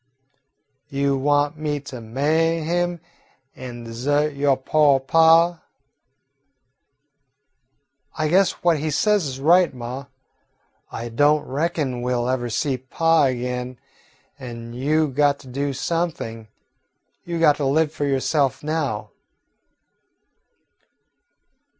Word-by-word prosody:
"You 140 Hz, 0 st, 0 dB
want 145 Hz, +2 st, +1 dB
me 150 Hz, -1 st, -2 dB
to 130 Hz, -3 st, -9 dB
ma'y 155 Hz, +8 st, 0 dB
him 175 Hz, +1 st, -1 dB, 0.6 s
an' 120 Hz, -2 st, -8 dB
desert 145 Hz, +6 st, -1 dB
yo' 140 Hz, -1 st, +2 dB
po' 140 Hz, +1 st, +3 dB
pa?" 165 Hz, +4 st, +4 dB, 2.6 s
"I 155 Hz, -1 st, 0 dB
guess 185 Hz, +3 st, +3 dB
what 170 Hz, -3 st, +3 dB
he 155 Hz, +2 st, -2 dB
says 205 Hz, +3 st, +1 dB
is 130 Hz, -1 st, -6 dB
right, 175 Hz, +5 st, +4 dB
ma. 125 Hz, +3 st, -7 dB, 0.8 s
I 120 Hz, +1 st, -5 dB
don't 145 Hz, +5 st, +2 dB
reckon 145 Hz, -3 st, -2 dB
we 125 Hz, +1 st, -1 dB
'll 120 Hz, 0 st, -1 dB
ever 125 Hz, -1 st, -1 dB
see 130 Hz, +4 st, -1 dB
pa 165 Hz, +4 st, +2 dB
again 125 Hz, 0 st, -3 dB, 0.6 s
an' 115 Hz, -2 st, -8 dB
you 150 Hz, +5 st, +1 dB
got 145 Hz, +1 st, +2 dB
to 130 Hz, -, -15 dB
do 140 Hz, +3 st, -2 dB
something. 140 Hz, -7 st, -3 dB, 0.8 s
You 170 Hz, -1 st, -4 dB
got 150 Hz, -3 st, +4 dB
to 145 Hz, -, -2 dB
live 150 Hz, +3 st, +2 dB
for 150 Hz, -2 st, -3 dB
yourself 135 Hz, 0 st, 0 dB
now." 145 Hz, -10 st, -2 dB
145 Hz, 115 wpm, -22 LUFS, 130-160 Hz, 2.6 s, pa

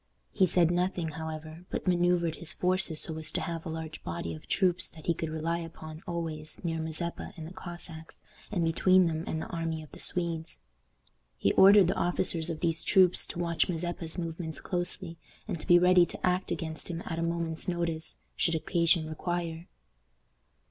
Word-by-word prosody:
He 190 Hz, -, +3 dB
said 175 Hz, -1 st, +3 dB
nothing, 175 Hz, -1 st, 0 dB
however, 160 Hz, +2 st, -7 dB
but -, -, -4 dB
manoeuvred 175 Hz, -2 st, +2 dB
his 165 Hz, -2 st, -1 dB
forces 180 Hz, -3 st, +2 dB
so 160 Hz, -1 st, -1 dB
as 155 Hz, -1 st, -5 dB
to -, -, 0 dB
have 165 Hz, -1 st, -4 dB
a -, -, -4 dB
large 160 Hz, -1 st, -6 dB
body 85 Hz, -1 st, -4 dB
of 80 Hz, -, -11 dB
troops 185 Hz, -2 st, +3 dB
that 160 Hz, -2 st, -13 dB
he 170 Hz, -, +2 dB
could 160 Hz, -1 st, -4 dB
rely 160 Hz, +2 st, -1 dB
upon 160 Hz, -1 st, -9 dB
always 160 Hz, -3 st, -4 dB
near 165 Hz, -1 st, -1 dB
Mazeppa 160 Hz, +2 st, -3 dB
and 160 Hz, -, -7 dB
the 170 Hz, -, -9 dB
Cossacks, 175 Hz, -3 st, -6 dB, 0.3 s
and 175 Hz, -5 st, +1 dB
between 185 Hz, +3 st, +4 dB
them 160 Hz, -1 st, -1 dB
and 160 Hz, -, -2 dB
the -, -, -4 dB
army 165 Hz, -2 st, -3 dB
of 155 Hz, -, -15 dB
the -, -, -12 dB
Swedes. 170 Hz, -2 st, +1 dB, 0.8 s
He 100 Hz, -, +2 dB
ordered 200 Hz, 0 st, +8 dB
the 190 Hz, -, +2 dB
officers 175 Hz, -1 st, +1 dB
of 160 Hz, -2 st, -4 dB
these 165 Hz, -1 st, 0 dB
troops 185 Hz, -2 st, +4 dB
to -, -, -7 dB
watch 170 Hz, 0 st, +1 dB
Mazeppa's 170 Hz, -1 st, -2 dB
movements 165 Hz, -2 st, -4 dB
closely, 175 Hz, -1 st, -2 dB, 0.3 s
and 170 Hz, -, -3 dB
to -, -, -7 dB
be 175 Hz, -1 st, +8 dB
ready 180 Hz, 0 st, +6 dB
to -, -, -4 dB
act 185 Hz, +1 st, +1 dB
against 160 Hz, -2 st, -3 dB
him 170 Hz, 0 st, -4 dB
at 165 Hz, -1 st, -3 dB
a -, -, -1 dB
moment's 170 Hz, 0 st, -2 dB
notice, 170 Hz, -2 st, -2 dB
should 165 Hz, -, +2 dB
occasion 165 Hz, 0 st, +2 dB
require. 170 Hz, +1 st, -3 dB
165 Hz, 185 wpm, -29 LUFS, 160-175 Hz, 0.8 s, ordered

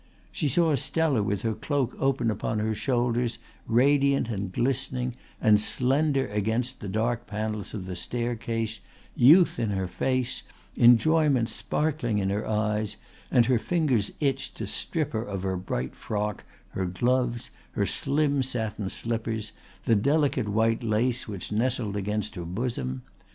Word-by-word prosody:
She 150 Hz, -, -1 dB
saw 160 Hz, +3 st, +3 dB
Stella 145 Hz, -2 st, +1 dB
with 100 Hz, -1 st, -1 dB
her 115 Hz, -1 st, 0 dB
cloak 130 Hz, +3 st, -1 dB
open 130 Hz, -4 st, +1 dB
upon 110 Hz, +1 st, -2 dB
her 110 Hz, +1 st, 0 dB
shoulders 120 Hz, +1 st, 0 dB, 0.3 s
radiant 140 Hz, +2 st, +3 dB
and 100 Hz, -4 st, -3 dB
glistening 125 Hz, +2 st, 0 dB, 0.3 s
and 105 Hz, -1 st, +5 dB
slender 135 Hz, +4 st, +1 dB
against 110 Hz, +5 st, -1 dB
the 105 Hz, -, -6 dB
dark 115 Hz, +4 st, -1 dB
panels 105 Hz, 0 st, -3 dB
of 95 Hz, -4 st, -5 dB
the 95 Hz, -1 st, -5 dB
staircase, 115 Hz, -1 st, -2 dB, 0.4 s
youth 165 Hz, +8 st, +6 dB
in 115 Hz, -, 0 dB
her 95 Hz, -2 st, -1 dB
face, 125 Hz, +8 st, -1 dB, 0.3 s
enjoyment 130 Hz, +1 st, +5 dB
sparkling 120 Hz, +2 st, -1 dB
in 95 Hz, -1 st, 0 dB
her 105 Hz, +2 st, -2 dB
eyes, 105 Hz, 0 st, 0 dB, 0.3 s
and 120 Hz, -, +4 dB
her 125 Hz, -2 st, +3 dB
fingers 135 Hz, -10 st, +1 dB
itched 135 Hz, -2 st, -1 dB
to 110 Hz, -, -3 dB
strip 150 Hz, -, -2 dB
her 110 Hz, -, 0 dB
of 100 Hz, -4 st, -5 dB
her 95 Hz, -1 st, -1 dB
bright 65 Hz, -9 st, -3 dB
frock, 105 Hz, -1 st, -3 dB, 0.2 s
her 95 Hz, -1 st, -2 dB
gloves, 120 Hz, +5 st, 0 dB, 0.2 s
her -, -, +1 dB
slim 145 Hz, -1 st, +1 dB
satin 110 Hz, -6 st, -2 dB
slippers, 110 Hz, -1 st, -3 dB, 0.3 s
the 115 Hz, -, +3 dB
delicate 140 Hz, 0 st, +2 dB
white 115 Hz, +2 st, +2 dB
lace 115 Hz, +2 st, 0 dB
which 100 Hz, -3 st, -5 dB
nestled 110 Hz, -1 st, 0 dB
against 105 Hz, +1 st, -2 dB
her 90 Hz, -, -6 dB
bosom. 85 Hz, -, -3 dB
115 Hz, 145 wpm, -27 LUFS, 105-130 Hz, 0.4 s, youth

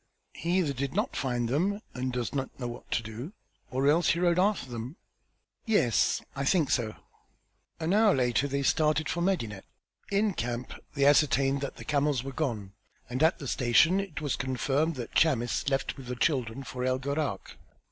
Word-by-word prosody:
"He 175 Hz, +3 st, -1 dB
either 160 Hz, -7 st, +1 dB
did 135 Hz, +1 st, -3 dB
not -, -, 0 dB
find 120 Hz, -3 st, -1 dB
them 180 Hz, -, 0 dB
and 130 Hz, 0 st, -2 dB
does 125 Hz, -1 st, -3 dB
not 135 Hz, -1 st, -4 dB
know 125 Hz, -, -3 dB
what 120 Hz, -, -9 dB
to 115 Hz, -, 0 dB
do 115 Hz, -, -7 dB, 0.4 s
or 135 Hz, +2 st, 0 dB
else 165 Hz, +4 st, +4 dB
rode 175 Hz, 0 st, +2 dB
after 200 Hz, -6 st, +1 dB
them." 120 Hz, +4 st, -6 dB, 0.7 s
"Yes, 130 Hz, -, +2 dB
I 140 Hz, -, -2 dB
think 155 Hz, -1 st, +2 dB
so." 110 Hz, -3 st, 0 dB, 0.8 s
An 165 Hz, +3 st, 0 dB
hour 215 Hz, 0 st, +5 dB
later 125 Hz, +1 st, +1 dB
they 140 Hz, 0 st, -1 dB
started 155 Hz, +2 st, +2 dB
for 170 Hz, +1 st, -2 dB
Medinet. 115 Hz, -, -1 dB, 0.5 s
In 205 Hz, 0 st, +2 dB
camp 120 Hz, -2 st, -4 dB, 0.2 s
they 140 Hz, -1 st, +2 dB
ascertained 140 Hz, -1 st, +4 dB
that 140 Hz, -, -4 dB
the -, -, -10 dB
camels 145 Hz, -4 st, +1 dB
were 135 Hz, -, -5 dB
gone, 110 Hz, -10 st, -3 dB, 0.4 s
and 130 Hz, +3 st, -2 dB
at 160 Hz, +1 st, +4 dB
the 140 Hz, -, -7 dB
station 130 Hz, +11 st, +4 dB
it 190 Hz, -6 st, -5 dB
was 145 Hz, -3 st, -1 dB
confirmed 135 Hz, +5 st, 0 dB
that 120 Hz, -3 st, -6 dB
Chamis 130 Hz, -4 st, +2 dB
left 135 Hz, -1 st, -1 dB
with 135 Hz, -2 st, -10 dB
the 125 Hz, -, -3 dB
children 125 Hz, -1 st, 0 dB
for 125 Hz, -1 st, -5 dB
El 130 Hz, 0 st, +1 dB
Gharak. 140 Hz, +3 st, -3 dB
140 Hz, 180 wpm, -29 LUFS, 125-160 Hz, 0.8 s, hour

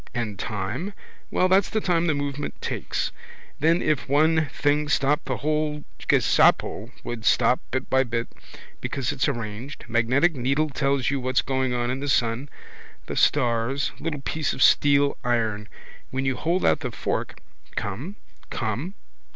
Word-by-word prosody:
And 110 Hz, -5 st, -3 dB
time, 105 Hz, -, -3 dB, 0.4 s
well 185 Hz, -, +2 dB
that's 190 Hz, +1 st, +4 dB
the 220 Hz, -, 0 dB
time 175 Hz, -4 st, +1 dB
the 155 Hz, -, +2 dB
movement 145 Hz, 0 st, -4 dB
takes. -, -, -2 dB, 0.5 s
Then 165 Hz, +3 st, +3 dB
if 140 Hz, -7 st, 0 dB
one 155 Hz, +2 st, +3 dB
thing 145 Hz, +1 st, 0 dB
stopped 145 Hz, +2 st, +2 dB
the -, -, -2 dB
whole 150 Hz, 0 st, -1 dB, 0.3 s
ghesabo -, -, +3 dB
would 120 Hz, -2 st, -5 dB
stop 125 Hz, -, +4 dB
bit 130 Hz, +1 st, -2 dB
by 130 Hz, 0 st, +3 dB
bit. 115 Hz, -1 st, -2 dB, 0.5 s
Because 135 Hz, -1 st, -2 dB
it's 145 Hz, 0 st, 0 dB
all 140 Hz, -, -1 dB
arranged. 115 Hz, +5 st, -7 dB
Magnetic 125 Hz, +8 st, +2 dB
needle 135 Hz, +4 st, 0 dB
tells 140 Hz, -1 st, +1 dB
you 140 Hz, -, 0 dB
what's 130 Hz, 0 st, +1 dB
going 130 Hz, -2 st, 0 dB
on 120 Hz, 0 st, 0 dB
in 130 Hz, -, -3 dB
the 145 Hz, +1 st, -3 dB
sun, 120 Hz, +3 st, +1 dB, 0.6 s
the -, -, -5 dB
stars. 125 Hz, 0 st, +2 dB
Little 150 Hz, -2 st, -3 dB
piece 155 Hz, +2 st, -1 dB
of 135 Hz, -, +2 dB
steel 140 Hz, 0 st, +4 dB
iron. 110 Hz, -4 st, 0 dB, 0.4 s
When 135 Hz, +1 st, -2 dB
you 135 Hz, -1 st, +1 dB
hold 170 Hz, +6 st, 0 dB
out -, -, +4 dB
the -, -, -3 dB
fork. -, -, -3 dB, 0.4 s
Come. 125 Hz, -, -4 dB, 0.3 s
Come. 125 Hz, -, -3 dB
135 Hz, 160 wpm, -25 LUFS, 120-150 Hz, 0.6 s, that's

